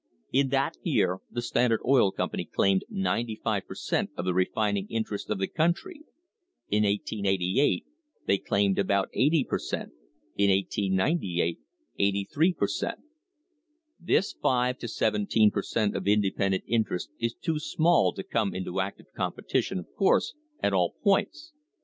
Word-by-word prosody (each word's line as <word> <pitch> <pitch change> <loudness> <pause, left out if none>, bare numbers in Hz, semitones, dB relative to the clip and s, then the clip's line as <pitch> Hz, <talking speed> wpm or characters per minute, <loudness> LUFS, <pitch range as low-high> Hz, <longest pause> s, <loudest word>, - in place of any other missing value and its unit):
In 135 +1 +2
that 135 - 0
year 90 +1 +1
the 120 - -4
Standard 120 -2 +2
Oil 125 -6 +4
Company - - -2
claimed 95 -1 +2
ninety 120 - -1
five - - -1
per - - -8
cent, - - -1
of 85 - -3
the 90 - +1
refining 100 +2 0
interests 110 -2 -3
of 105 - 0
the 95 - 0
country. 175 - -1 0.7
In 105 +1 +2
1888 100 - +1 0.4
they 100 - +2
claimed 100 -1 +1
about 100 0 +1
eighty 150 +2 +3
per - - -2
cent; - - -4 0.4
in 100 0 +3
1898, 95 - 0 0.4
eighty 100 0 +1
three 165 +5 +4
per - - 0
cent. - - -3 1.0
This 180 +2 +1
five 125 0 +1
to 120 - -5
seventeen 105 -1 +2
per 100 - -1
cent, 105 0 -1
of - - -3
independent 100 -2 +1
interest 110 -6 -1
is 115 0 -1
too 160 -3 -2
small 165 +2 +3
to - - -6
come 115 - -1
into 95 0 -3
active 95 +1 -7
competition, - - -1
of 90 - -5
course, 195 - +2 0.3
at 100 - +2
all 90 -2 +1
points. 310 - +1
105 Hz, 150 wpm, -27 LUFS, 95-135 Hz, 1.0 s, Oil